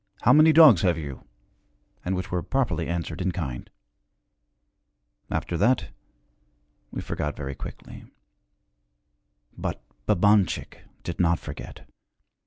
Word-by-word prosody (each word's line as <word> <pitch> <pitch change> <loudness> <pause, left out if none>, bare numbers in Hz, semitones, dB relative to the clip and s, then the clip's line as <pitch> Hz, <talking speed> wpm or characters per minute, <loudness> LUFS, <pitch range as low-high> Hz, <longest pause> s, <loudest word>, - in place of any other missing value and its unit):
How 125 - +6
many 155 +2 +7
dogs 155 - +8
have 90 -3 +2
you?' 70 -5 -7 0.8
and 95 +1 -1
which 95 - -4
were 90 -1 0
properly 125 - -1
answered 85 0 -3
in 95 0 0
kind. 70 -9 -5 1.6
After 85 - -2
that, 120 +8 +2 1.0
we - - -5
forgot - - -4
very 70 -1 -5
quickly. - - -10 1.5
But - - -4 0.3
Babanchik 100 -2 +2 0.2
did 85 -1 -5
not 85 -1 +3
forget. - - -9
90 Hz, 110 wpm, -25 LUFS, 80-105 Hz, 1.6 s, dogs